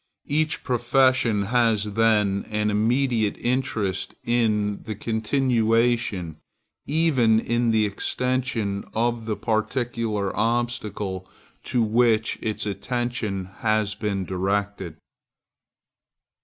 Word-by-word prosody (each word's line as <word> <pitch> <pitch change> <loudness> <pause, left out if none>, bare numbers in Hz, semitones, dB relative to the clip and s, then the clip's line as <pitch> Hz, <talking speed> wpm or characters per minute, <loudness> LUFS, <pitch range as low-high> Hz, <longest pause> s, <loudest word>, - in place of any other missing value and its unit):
Each 155 +2 0
profession 125 -3 +2
has 110 -2 +1
then 105 -3 +2
an 105 0 0
immediate 115 0 +1
interest 110 -7 -1
in 105 -4 +1
the 110 -2 -6
continuation, 115 - +1 0.5
even 140 -8 +3
in 120 +1 0
the 110 -1 +3
extension, 115 -1 -1
of 115 0 0
the 110 - 0
particular 110 -1 -1
obstacle 105 -5 -2 0.4
to 120 -1 +1
which 115 0 +2
its 110 -1 -3
attention 105 -2 -3
has 110 -2 +1
been 100 -2 -2
directed. 95 -2 -2
110 Hz, 90 wpm, -24 LUFS, 105-120 Hz, 0.5 s, even